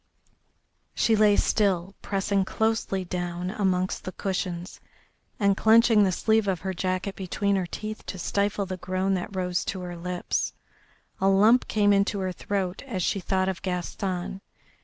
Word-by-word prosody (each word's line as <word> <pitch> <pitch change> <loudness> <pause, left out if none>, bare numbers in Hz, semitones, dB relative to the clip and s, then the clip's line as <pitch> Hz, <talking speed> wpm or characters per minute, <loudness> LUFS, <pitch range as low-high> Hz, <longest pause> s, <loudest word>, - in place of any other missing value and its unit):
She 225 - +3
lay 210 -1 +5
still, 195 -4 +1
pressing 195 0 0
closely 220 -2 -1
down 175 0 -3
amongst 185 -3 0
the 185 - -5
cushions, 180 -2 -4 0.6
and 200 -2 +3
clenching 225 0 +5
the 190 - +3
sleeve 220 +3 +2
of 185 -4 0
her 190 +1 -3
jacket 185 +2 -2
between 200 +2 -1
her 185 -2 -1
teeth 215 +4 -6
to 190 - -5
stifle 200 +3 0
the 185 -1 -5
groan 185 +2 -1
that 190 +2 -3
rose 180 -1 0
to 190 - -3
her 175 -1 -6
lips. 180 +1 -2 0.7
A 190 - +2
lump 210 +6 +5
came 205 -1 +3
into 200 +1 +2
her 190 -1 -1
throat 190 0 -3
as 190 -8 -2
she 195 - 0
thought 190 0 0
of 190 -1 -2
Gaston. 185 +1 -3
190 Hz, 160 wpm, -26 LUFS, 180-205 Hz, 0.7 s, lay